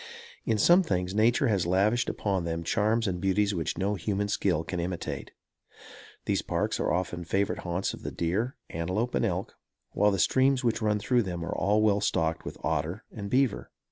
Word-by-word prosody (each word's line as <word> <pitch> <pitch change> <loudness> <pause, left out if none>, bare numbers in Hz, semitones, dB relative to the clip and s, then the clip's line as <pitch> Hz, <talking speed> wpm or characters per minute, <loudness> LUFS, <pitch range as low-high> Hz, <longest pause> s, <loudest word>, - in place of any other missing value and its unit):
In 110 - +1
some 175 - +6
things 90 - -1
nature 120 +7 +3
has 95 -6 +1
lavished 105 +7 +2
upon 95 -4 -1
them 85 0 -3
charms 110 +6 +1
and 90 -2 -2
beauties 100 +1 +2
which 85 -4 -2
no 100 +1 0
human 100 +1 -2
skill 90 -6 +1
can 90 +1 -4
imitate. 85 0 -4 1.0
These - - +1
parks - - -1
are 90 +1 +1
favorite 90 +3 -2
haunts 90 +2 -2
of - - -9
the - - -4
deer, 100 +10 -1 0.2
antelope 95 +9 -2
and - - +1
elk, - - -2 0.4
while 105 +1 +3
the 100 - 0
streams 130 +6 +3
which 115 -1 0
run 105 -1 +2
through 120 +4 +2
them 90 -5 -4
are 100 +4 +1
well 105 -1 +3
stocked 80 -5 0
with - - -6
otter 80 +7 -1
and 100 -2 -6
beaver. 130 -1 +1
100 Hz, 180 wpm, -28 LUFS, 90-110 Hz, 1.0 s, some